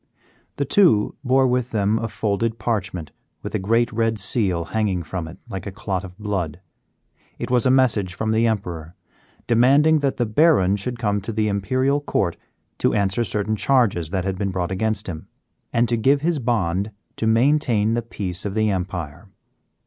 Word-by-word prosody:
The 140 - -1
two 145 - +4
bore 130 0 +3
with 125 -1 0
them 105 0 +1
a 115 - -2
folded 110 +1 -1
parchment 100 -8 -3 0.3
with - - -6
a - - 0
great 115 +5 +1
red 115 0 0
seal 95 -4 +1
hanging 100 -5 0
from 85 -1 -5
it 80 - -10
like 95 -3 -6
a - - -4
clot 95 -2 -3
of 90 -1 -10
blood; 95 -7 -3 0.8
it - - -5
was 125 +1 +3
a - - +4
message 115 -8 +2
from 110 +2 -1
the 115 +1 +3
Emperor 90 -7 -3 0.5
demanding 140 +7 +4
that 140 -2 -1
the 120 - +1
Baron 110 - +3
should 120 +5 -4
come 105 -3 0
to 105 - -5
the 110 0 0
Imperial 130 +8 0
Court 95 -11 -1 0.4
to - - +2
answer 100 +3 +1
certain 105 -1 -1
charges 105 - +2
that 95 0 -2
had 95 -1 -2
been 100 -2 -1
brought 90 -1 -2
against 105 +2 -1
him, 80 -4 -7 0.4
and 120 +1 +2
to 120 - +1
give 135 +5 +3
his 165 -1 0
bond 105 -5 0 0.3
to 110 - -1
maintain 115 -2 +2
the 120 - 0
peace 95 -5 -3
of 100 -1 -4
the 110 -1 +2
empire. 90 -1 -4
110 Hz, 180 wpm, -22 LUFS, 95-120 Hz, 0.8 s, two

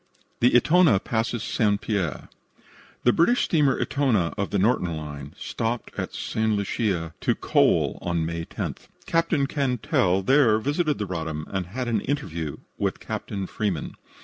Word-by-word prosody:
THE 120 +1 +4
"ETONA" 155 - +5
PASSES 115 0 -1
ST. 105 -2 +1
PIERRE 100 -8 -2 0.8
The 120 - +5
British 240 +9 +3
steamer 150 -5 +2
Etona, 120 -12 +1
of 100 - -2
the 100 - 0
Norton 90 -5 +1
Line, 75 0 -8
stopped 115 +2 -3
at - - -4
St. 110 0 0
Lucia 100 -5 -1
to - - +2
coal - - +2
on 85 -2 -1
May 85 0 -3
10th. - - -6 0.2
Captain 165 -3 +1
Cantell 125 - +1
there 130 -2 +5
visited 145 +6 0
the 105 - -2
Roddam 80 -4 -4
and 95 -2 -2
had 125 +6 -4
an 110 -4 +1
interview 85 - -3 0.2
with - - -1
Captain 100 -2 -4
Freeman. 95 -6 -3
105 Hz, 150 wpm, -25 LUFS, 90-130 Hz, 0.8 s, ETONA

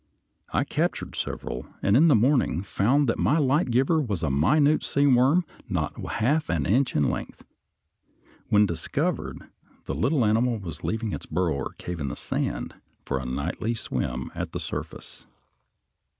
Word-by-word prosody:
I - - +2
captured - - -2
several, - - -4 0.2
and 100 - +4
in 155 +6 +6
the 150 - +6
morning 120 - +2
found 125 +9 +2
that 115 - 0
my 150 - +3
light 145 -1 +2
giver 135 +7 +3
was 100 - -2
a 75 - +1
minute 145 - +3
sea 140 +1 +1
worm 140 +6 +4 0.2
not 85 -6 -1 0.2
half 145 +8 +1
an 80 -5 0
inch 125 - +2
in 75 - +3
length. - - -6 1.0
When 105 0 +5
discovered, 85 -4 -2 0.5
the - - -3
little 125 - +2
animal 115 +3 +2
was 85 -7 -8
leaving 110 -1 -2
its - - -6
burrow 85 0 0
or 70 -1 -4
cave 90 -1 -6
in 70 - -2
the - - -4
sand - - -3 0.3
for 65 - -1
a 65 - -5
nightly 85 - -2
swim 65 - -3
at - - -5
the - - -3
surface. - - -7
110 Hz, 165 wpm, -26 LUFS, -, 1.0 s, in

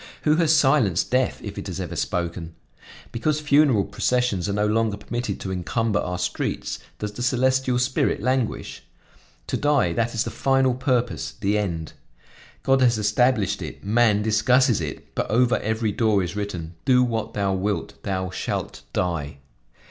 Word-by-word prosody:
Who 155 0 +3
has 165 -3 +3
silenced 135 - +3
death 130 0 +1
if - - -6
it - - -6
has - - -5
ever - - -4
spoken? 85 -1 -3 0.6
Because 150 +6 0
funeral 145 -7 +4
processions 125 -7 0
are - - -1
no 105 +1 +1
longer 110 -1 +1
permitted 120 0 -4
to 95 - -4
encumber 105 +4 -1
our 90 0 -3
streets, - - -3 0.2
does 105 -1 -4
the 105 - -8
celestial 130 0 +2
spirit 125 +1 +1
languish? 130 +1 -1 0.6
To - - -2
die, 145 - +2
that 115 +6 -1
is 115 - +1
the - - -5
final 135 -1 +2
purpose, 125 -2 -1
the 100 +1 +1
end. 85 -7 -2 0.7
God 135 0 +3
has 120 -3 +4
established 105 -2 +1
it, - - -7
man 105 0 +3
discusses 115 +1 +3
it; 75 -3 -7
but - - -2
over 125 +3 +3
every 110 0 -1
door 105 -2 +2
is 90 +3 -5
written: 90 -6 -4
'Do 125 -1 +5
what 115 -2 -2
thou 100 -1 0
wilt, 100 +2 -3
thou 95 -2 -2
shalt - - -4
die.' 80 -5 -2
110 Hz, 165 wpm, -24 LUFS, 100-125 Hz, 0.7 s, Do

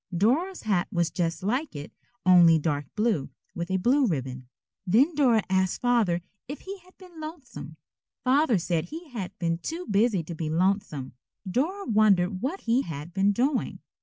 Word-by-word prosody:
Dora's 310 - +1
hat 190 -4 +1
was 170 -2 0
just 170 0 -2
like 250 - -1
it, 145 +1 -7 0.3
only 175 -3 +7
dark 145 -3 -2
blue, 210 - 0 0.2
with 170 +1 -5
a 190 - +1
blue 255 +8 +3
ribbon. 130 - -4 0.4
Then 255 - +4
Dora 250 -8 +3
asked 190 -1 +1
Father 225 -9 +2 0.2
if 285 +3 -7
he 390 +1 -8
had 365 +1 -23
been 360 -4 -14
lonesome. 310 -5 -9 0.5
Father 265 -2 +3
said 170 -2 -1
he 320 - -9
had 200 -5 -6
been 165 -3 -1
too 330 - -5
busy 205 -3 +2
to 170 - -7
be 155 -1 -4
lonesome. 170 -5 -1 0.3
Dora 325 - -1
wondered 200 -4 +3
what 305 +11 -3
he 235 +3 +2
had 160 - -7
been 195 +2 +3
doing. 255 +6 0
205 Hz, 165 wpm, -26 LUFS, 170-270 Hz, 0.5 s, only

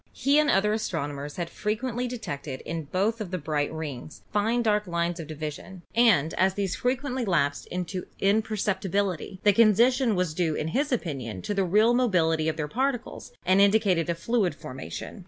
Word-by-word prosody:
He 285 +2 +3
and 305 -1 +3
other 210 +2 +3
as 220 - -2
tronomers 145 -3 -4
had 175 -2 -3
frequently 240 +6 -2
detected 145 - -5
in 165 -1 -5
both 205 +9 0
of 205 - -4
the 185 - -2
bright 150 -2 -1
rings 155 -3 -7
fine 225 +4 +1
dark 210 -2 +1
lines 170 0 -1
of 160 - -6
division, 155 +4 -7
and 220 -11 +4
as 190 +1 +3
these 195 -3 -1
frequently 260 0 -1
lapsed 155 -8 0
into 180 +1 -4
imperceptibility 200 -3 0
the 205 - +5
condition 230 +3 +4
was 180 -4 0
due 160 -2 0
in 155 - -2
his 280 - 0
opinion 130 - -3
to - - -2
the 200 -1 +1
real 210 +6 +4
mobility 165 -10 +2
of 155 - -3
their 150 -2 -2
particles 255 - -2
and 190 +1 +4
indicated 200 -5 +3
a 170 - +1
fluid 200 +1 0
formation. 130 - -8
190 Hz, 175 wpm, -26 LUFS, 160-225 Hz, -, the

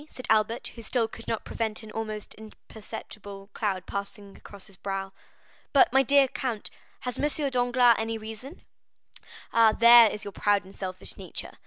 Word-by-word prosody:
said 255 - -8
Albert, 220 +2 +1
who 230 - -10
still 230 0 0
could 230 - -12
not 225 - -3
prevent 220 -1 -3
an 215 - -10
almost 215 -1 -5
imperceptible 210 -2 -11
cloud 190 -4 -2
passing 200 0 -6
across 200 -2 -12
his 195 - -15
brow. 195 0 -5 0.6
"But, 275 -3 +5
my 270 - +6
dear 275 +1 +5
count, 245 -4 -4 0.3
has 250 -1 -4
M. 295 -1 0
Danglars 245 -1 +4
any 225 0 -2
reason?" 225 +8 -9 0.9
"Ah! 225 -2 +6
there 235 0 +8
is 210 - -6
your 200 - -5
proud 205 -1 +1
and 190 - -15
selfish 185 -1 -5
nature. - - -7
220 Hz, 165 wpm, -27 LUFS, 205-240 Hz, 0.9 s, there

